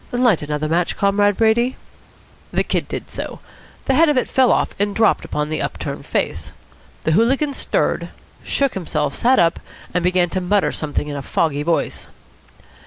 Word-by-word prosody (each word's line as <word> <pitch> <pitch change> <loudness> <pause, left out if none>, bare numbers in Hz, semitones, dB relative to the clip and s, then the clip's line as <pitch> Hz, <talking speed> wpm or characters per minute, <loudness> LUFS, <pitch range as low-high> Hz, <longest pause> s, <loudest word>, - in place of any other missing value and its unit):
Light 245 -7 +3
another 150 +1 -2
match, 170 +2 0
Comrade 205 0 +2
Brady." 235 +3 +2 0.7
The - - +1
Kid - - -2
did - - -6
so. - - -6 0.5
The 270 - +2
head 320 +4 +5
of 295 - +2
it 255 - +1
fell 260 -2 +3
off - - +1
and 205 0 0
dropped 225 0 +3
upon 150 0 -3
the 155 - -2
up - - -3
turned - - -6
face. - - -2 0.5
The 160 - +1
hooligan 265 - +2
stirred, - - -1 0.3
shook 275 -2 0
himself, 155 -6 -2
sat 255 +2 +3
up, 165 -1 +3 0.3
and 180 -1 0
began 180 -1 +2
to 185 - -1
mutter 200 +2 +2
something 150 -1 -3
in 145 - -4
a 140 - -4
foggy 145 +1 0
voice. 165 +2 -1
195 Hz, 175 wpm, -20 LUFS, 160-240 Hz, 0.7 s, head